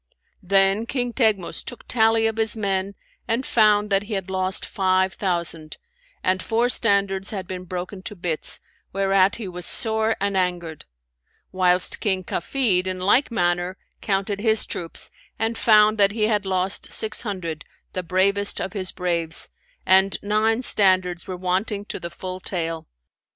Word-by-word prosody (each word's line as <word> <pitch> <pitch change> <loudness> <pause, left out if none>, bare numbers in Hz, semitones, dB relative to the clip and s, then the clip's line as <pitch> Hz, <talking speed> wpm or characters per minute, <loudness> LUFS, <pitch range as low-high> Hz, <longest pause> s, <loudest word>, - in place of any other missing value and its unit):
[FN#557] 180 - -21
Then 195 +2 +4
King 245 -2 -2
Teghmus 215 -8 +1
took 245 - -7
tally 225 -1 +3
of 225 0 0
his 225 0 +1
men 195 -1 -1 0.3
and 235 +3 -1
found 210 -2 +3
that 195 0 +3
he 205 +2 -7
had 190 -1 -4
lost 185 0 -1
five 190 -1 +1
thousand, 170 -4 -3 0.5
and 185 0 +1
four 235 +2 +1
standards 200 -5 +2
had 195 -3 -4
been 185 -1 -7
broken 185 +2 -6
to 210 - -7
bits, 170 -4 -1 0.3
whereat 195 0 +3
he 225 -4 -6
was 180 -1 -5
sore 220 0 +2
an 200 0 -1
angered; 175 -4 -2 0.7
whilst 180 -1 +2
King 190 -3 0
Kafid 190 -1 0
in 185 0 -2
like 205 +9 +3
manner 175 -3 -1 0.2
counted 200 0 -1
his 220 0 +3
troops 165 -2 -4 0.3
and 225 +1 -1
found 215 -1 +4
that 200 0 +4
he 220 -1 -1
had 210 -2 +1
lost 190 +1 -1
six 220 - +1
hundred, 180 -8 -5 0.3
the 185 - -2
bravest 195 +3 +1
of 190 - -4
his 190 -3 -3
braves, 170 -3 -1 0.4
and 190 +1 +4
nine 220 +3 +1
standards 185 -5 +2
were 185 -1 -5
wanting 195 +3 -2
to - - -6
the 170 - -6
full 185 +1 -7
tale. 165 -3 -3
195 Hz, 160 wpm, -23 LUFS, 185-215 Hz, 0.7 s, Then